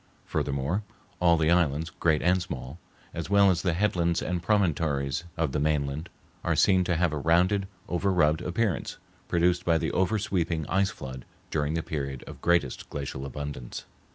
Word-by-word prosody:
Furthermore, 70 +8 -1 0.4
all 85 -1 +5
the 80 +1 +2
islands, 80 -2 +2
great 80 -2 +1
and 90 +2 +3
small, 70 -1 -6 0.3
as 85 +1 -5
well 100 -1 +6
as 85 -2 0
the 90 - +1
headlands 85 -3 +1
and 90 -1 -2
promontories 80 -7 +1
of 80 -4 0
the 75 - -1
mainland, 75 +1 -1 0.3
are - - +1
seen 95 -1 +4
to 85 - +1
have 85 -1 +1
a 75 - -2
rounded, 90 +6 +3 0.2
over 95 +3 0
rubbed 80 -3 +3
appearance 90 +2 -1 0.3
produced 85 +1 +2
by 85 -2 +3
the - - -1
over 95 +4 +1
sweeping 85 -6 -1
ice 95 +5 +1
flood 65 -7 -8 0.3
during 75 0 0
the 80 - -1
period 70 -4 -4
of - - -10
greatest 85 -6 +1
glacial 70 -1 -5
abundance. 70 -2 -6
85 Hz, 170 wpm, -27 LUFS, 75-90 Hz, 0.4 s, well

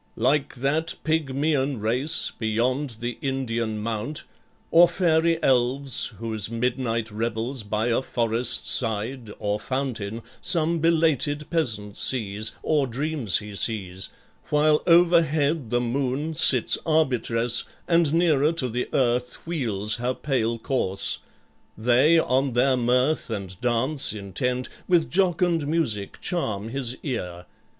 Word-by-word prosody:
like 145 0 +1
that 150 +6 -1
Pygmaean 145 -3 0
race 125 +9 0
Beyond 120 +3 -1
the 120 -1 -4
Indian 115 -5 -2
mount, 115 +7 -3 0.5
or 170 +1 +7
fairy 165 -2 +2
elves 130 -1 +1
Whose 110 -1 -3
midnight 115 -1 -2
revels 115 +4 -3
by 105 +2 -1
a 115 - +1
forest 120 -1 -1
side, 115 0 0
Or 105 0 -2
fountain, 115 -5 -3 0.2
some 170 -2 +3
belated 155 -3 +1
peasant 105 -11 -1
sees 110 -3 0
(Or 150 -3 +1
dreams 135 -3 0
he 105 -1 -7
sees), 95 -4 -3 0.4
while 150 0 +3
overhead 165 -5 +3
the 120 +1 +1
moon 135 +5 -2
Sits 130 -5 +4
arbitress, 125 -7 +2 0.2
and 165 -3 +3
nearer 160 -3 +3
to 135 -7 -1
the 125 +2 -3
earth 125 -1 0
Wheels 110 - -2
her 125 +1 -2
pale 120 -5 -1
course; 110 -6 0 0.6
they 125 +9 +4
on 135 -3 +1
their 130 +2 +3
mirth 125 +5 +1
and 95 -4 -6
dance 125 +4 +1
Intent, 125 +5 -2 0.2
with 175 -3 +2
jocund 175 -4 +1
music 120 -11 -2
charm 110 - -2
his 130 -1 -4
ear. 90 - -4
125 Hz, 120 wpm, -24 LUFS, 115-150 Hz, 0.6 s, or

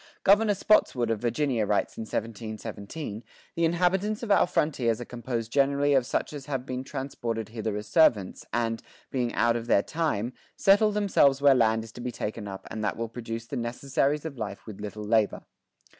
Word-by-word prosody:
Governor 205 +1 +5
Spotswood 130 - +3
of 110 - -1
Virginia 120 -2 0
writes 105 - 0
in - - -6
1717, 110 +2 -5 0.3
"The 170 - +1
inhabitants 185 +6 +1
of 220 - -2
our 200 - +5
frontiers 125 -9 +1
are 120 - -5
composed 120 -1 -4
generally 140 +1 +3
of 130 -3 +3
such - - -1
as 140 -1 -8
have 135 -3 -3
been 130 -1 -4
transported 120 -5 -4
hither 110 -2 -3
as 105 - -5
servants, 105 - +3
and, 115 -1 -1 0.3
being 125 -3 0
out 115 0 +3
of 120 0 -4
their 100 -4 +4
time, 145 -8 -1 0.2
settle 210 +2 +4
themselves 195 -10 +3
where 140 -1 +6
land 110 -3 +3
is 115 - -11
to 120 - -10
be 125 0 -3
taken 105 -2 -5
up 95 -1 -8
and 110 -1 -4
that 100 - -1
will 115 0 -3
produce 115 -1 -6
the - - -5
necessarys 135 +5 -1
of 140 -6 -6
life 100 -2 -5
with 105 -2 -9
little 105 0 -6
labour." 110 -1 +1
120 Hz, 190 wpm, -27 LUFS, 110-145 Hz, 0.3 s, where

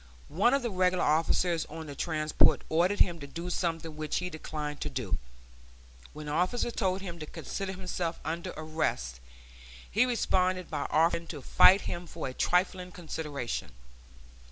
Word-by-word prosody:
One 225 - +3
of 275 - 0
the 235 - -1
regular 185 -1 +2
officers 165 +2 +2
on 160 +1 -8
the 145 - -7
transport 155 +1 +2
ordered 175 +5 +2
him 170 -1 +3
to 140 - -7
do 170 +5 -5
something 165 -3 -2
which 155 -1 -2
he 180 0 -2
declined 150 -2 -5
to - - -2
do. - - -2 0.9
When 150 0 -8
the 150 - -4
officer 185 +10 +1
told 190 -4 0
him 175 -3 -6
to 155 - -6
consider 195 +4 -4
himself 180 -2 -3
under 165 +2 -3
arrest, 155 - -2 0.7
he 225 +5 +4
responded 185 -6 +1
by - - -2
offering 165 +1 +2
to 145 -5 -7
fight 190 +9 +7
him 175 0 -4
for 160 -2 -5
a 130 - -5
trifling 180 +3 +1
consideration. 150 - -4
170 Hz, 160 wpm, -30 LUFS, 155-185 Hz, 0.9 s, fight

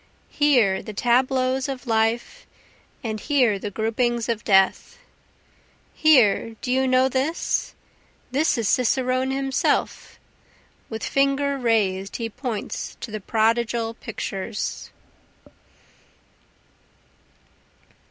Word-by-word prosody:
Here 245 -10 +3
the 215 - -8
tableaus 255 +3 +1
of 270 -1 -6
life, 225 0 -1 0.6
and 220 -2 -3
here 250 -9 +2
the 205 - -4
groupings 230 +3 -1
of 225 -2 -2
death; 195 - +2 1.0
Here, 235 -7 +4
do 250 - -2
you 265 +1 +2
know 255 0 +4
this? 270 +5 -1 0.6
this 285 +3 +1
is 230 -3 -1
cicerone 255 +2 +1
himself, 270 0 -1 0.7
With 220 -2 -6
finger 275 +1 +1
rais'd 205 -6 0
he 230 -1 -4
points 245 -3 -5
to 230 - -7
the 215 -1 -5
prodigal 230 +2 0
pictures. 205 -3 -5
240 Hz, 95 wpm, -23 LUFS, 220-265 Hz, 1.0 s, Here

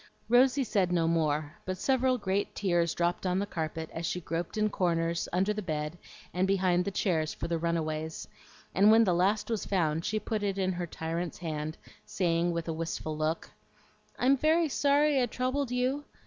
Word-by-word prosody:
Rosy 260 +3 +5
said 195 -7 +1
no 170 -2 +2
more, 155 -2 0
but 185 0 -3
several 260 +3 +2
great 200 -2 -1
tears 175 -4 +1
dropped 175 +1 0
on 180 0 +1
the 200 - 0
carpet 160 -3 -4
as 165 - -5
she 180 - -1
groped 170 +3 -4
in 215 0 +3
corners, 170 -4 0
under 190 +4 +1
the 210 - -3
bed, 155 -3 -3 0.4
and 185 +1 +1
behind 185 -2 +2
the - - 0
chairs 165 -5 0
for - - -4
the 170 -1 -1
run 170 +1 0
aways; 155 0 -4 0.5
and 200 +3 +5
when 225 +1 +7
the 185 -5 +2
last 195 +5 +2
was 225 - -1
found 165 -4 0
she 215 +4 -1
put 215 0 -3
it 200 -1 -1
in 190 -1 +1
her 175 -1 -3
tyrant's 165 +2 -4
hand, 155 -2 -4 0.3
saying, 170 -1 0
with 170 0 -3
a 165 - -1
wistful 160 -1 -4
look, 155 +2 -2 0.7
"I'm 265 +3 +4
very 315 +3 +3
sorry 285 0 +3
I 245 - +2
troubled 255 +3 -1
you. 255 +3 0
180 Hz, 190 wpm, -30 LUFS, 165-215 Hz, 0.7 s, when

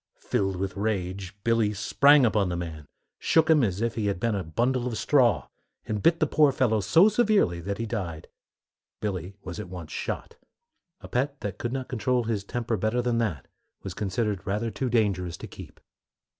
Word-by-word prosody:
Filled 95 -1 -1
with 95 +1 -3
rage, 100 -2 -3
Billy 115 -2 +2
sprang 140 +6 +5
upon 105 -4 +2
the 90 - -2
man, 80 -4 -6 0.3
shook 160 0 +3
him 150 -4 +5
as 100 -2 -1
if 115 0 0
he 110 -3 -1
had 100 -3 -1
been 115 +1 0
a 100 -2 -2
bundle 120 +10 0
of 115 -3 -3
straw, 120 - +3 0.4
and 105 -1 -2
bit 165 - +4
the - - +3
poor 150 -1 +4
fellow 120 -5 +2
so 165 - +5
severely 215 - +2
that 100 +3 -3
he 115 - -2
died. 90 -9 -4 0.7
Billy 95 -2 -4
was 90 +2 -6
at 105 -4 -6
once 85 -4 -8
shot. - - -5 0.6
A - - -9
pet 140 +3 -1
that 100 -3 -5
could 120 - -2
not 130 -1 -3
control 125 +1 0
his 110 -3 -2
temper 115 +2 -2
better 110 +5 0
than 120 -1 +1
that 90 - -2 0.4
was - - -5
considered 105 -1 -2
rather 105 +3 -1
too 125 +5 -2
dangerous 95 -7 0
to - - -8
keep. - - -12
110 Hz, 190 wpm, -27 LUFS, 95-125 Hz, 0.7 s, sprang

